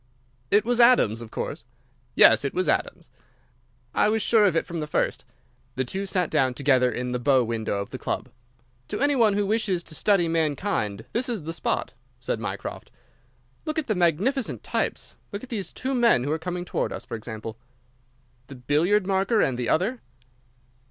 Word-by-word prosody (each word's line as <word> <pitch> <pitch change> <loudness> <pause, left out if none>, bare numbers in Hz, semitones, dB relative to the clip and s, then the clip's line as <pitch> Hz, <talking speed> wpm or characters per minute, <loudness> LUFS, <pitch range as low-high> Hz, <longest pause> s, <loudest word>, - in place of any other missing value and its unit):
"It 210 +2 +4
was 245 0 +1
Adams, 235 - +5
of 115 - -9
course." - - -5 0.5
"Yes, 115 +2 +7
it 140 - -3
was 185 -2 0
Adams." - - -1 0.8
"I - - +3
was 220 -1 +1
sure 220 -3 +4
of 185 -5 +2
it 165 - +1
from 170 -2 -5
the 150 - -3
first." - - -1 0.5
The 130 - -1
two 195 +10 -4
sat 185 -3 0
down 130 -5 +2
together 130 -3 +3
in 125 +2 -3
the 125 - -1
bow 130 0 +3
window 115 -2 -2
of 100 +4 -5
the 130 - -6
club. - - -3 0.6
"To - - -4
any 285 +1 +2
one 220 -5 +4
who 205 0 +1
wishes 200 -4 0
to 160 - -7
study 180 +1 +2
mankind 155 - -1
this 250 +2 -1
is 220 -9 -3
the 165 +2 -5
spot," 165 - -2 0.3
said - - -2
Mycroft. - - -6 0.8
"Look 310 -1 -3
at 315 - 0
the 220 - 0
magnificent 195 - 0
types! - - -3
Look 200 +2 -6
at 260 - -10
these 200 -7 -4
two 265 +1 -3
men 235 - +4
who 145 - -2
are 160 - -1
coming 180 +2 -4
towards - - -2
us, - - -7
for - - -9
example." 110 0 -7 0.9
"The 140 - -10
billiard 160 +11 +1
marker 195 +3 +1
and 130 - +2
the 120 -2 -2
other?" 215 +10 +1
175 Hz, 190 wpm, -25 LUFS, 130-215 Hz, 0.9 s, Yes